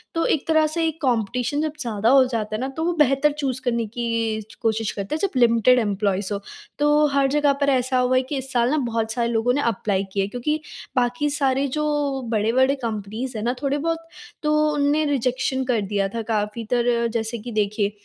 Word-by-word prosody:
तो 330 - +1
एक 295 - 0
तरह 315 -1 +4
से 330 +2 -1
एक 320 0 -5
कॉम्पिटिशन 250 +3 0
जब 310 -1 -2
ज़्यादा 225 -2 0
हो 270 0 +7
जाता 220 -4 -3
है - - -3
ना 265 - -1
तो 320 - -1
वो 350 - +1
बेहतर 275 +1 +4
चूज़ 275 -4 -3
करने 235 -2 0
की 230 -1 -2
च 215 - -15
कोशिश 220 -1 0
करते 200 +8 -4
हैं - - -3
जब 395 - 0
लिमिटेड 240 +1 +5
एम्प्लॉइज़ 200 -2 -1
हों। 200 - -2 0.4
तो 295 +1 +4
हर 275 -1 +3
जगह 290 0 +3
पर 280 - +3
ऐसा 255 -1 +1
हुआ 250 +1 +2
है 255 - +4
कि 285 - -2
इस 265 0 -6
साल 240 0 +2
ना 310 - +2
बहुत 230 -4 -1
सारे 235 0 0
लोगों 235 +2 +1
ने 285 - 0
एप्लाई 200 -2 -1
किया 195 -1 +1
है - - -2
क्योंकि 300 +7 -2 0.4
बाकी 250 +4 +1
सारे 275 -1 +1
जो 300 - 0 0.5
बड़े-बड़े 240 +6 +2
कंपनीज़ 225 0 -4
हैं 210 - -4
ना 245 - +1
थोड़े 280 0 0
बहुत, 330 +2 -1 0.5
तो 305 0 +3
उनने 295 +1 +2
रिजेक्शन 260 -1 0
कर 235 -4 +1
दिया 200 0 -1
था 230 - -1
काफ़ी 215 +1 -2
तरह। 235 -1 +2
जैसे 225 +1 -3
कि 240 +3 -7
देखिए, 210 -1 0
245 Hz, 215 wpm, -23 LUFS, 220-280 Hz, 0.5 s, हो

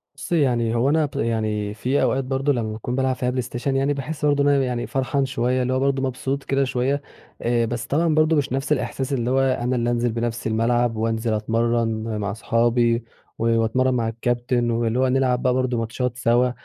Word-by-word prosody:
بُصّي، 150 +4 -1
يعني 120 -4 +1
هو 120 +4 +2
أنا 155 +1 +3
ب 145 - -9
يعني 110 -2 -1
في 125 +6 0
أوقات 135 - +1
برضه 135 +2 0
لمّا 115 -4 -2
باكون 110 +3 -4
بالعب 130 -1 +1
فيها 125 0 -1
بلايستيشن، 125 +1 -2
يعني 135 +2 +1
باحس 150 +2 -4
برضه 145 -1 +3
أنا 140 -1 +3
يعني 125 -2 -2
فرحان 135 +1 0
شويّة، 130 0 0
اللي 125 +1 0
هو 130 - +1
برضه 135 0 +1
مبسوط 135 +1 -2
كده 135 0 +1
شويّة، 130 +2 0 0.4
آآ 120 0 +1
بس 115 0 -3
طبعًا 160 +2 +1
برضه 155 +1 +3
مش 145 -4 0
نفس 135 +3 -2
الإحساس 135 -1 -1
اللي 120 -2 -1
هو 130 +1 +2
أنا 130 -1 +1
اللي 120 -1 0
أنزِل 120 0 0
بنفسي 115 0 -2
الملعب 115 +1 +1
وأنزِل 110 0 -1
أتمرّن 115 +2 +1 0.2
م 110 -2 -3
مع 100 0 -2
صحابي 115 +1 +1 0.4
و - - -1 0.2
وأتمرّن 130 +4 +1
مع 120 -2 0
الكابتن 120 +1 -1
واللي 115 +1 0
هو 130 - +3
نلعب 130 -1 +1
بقى 125 - +2
برضه 130 -1 0
ماتشات 115 +2 -2
سوا. 125 +1 +2
125 Hz, 205 wpm, -22 LUFS, 115-135 Hz, 0.4 s, أنا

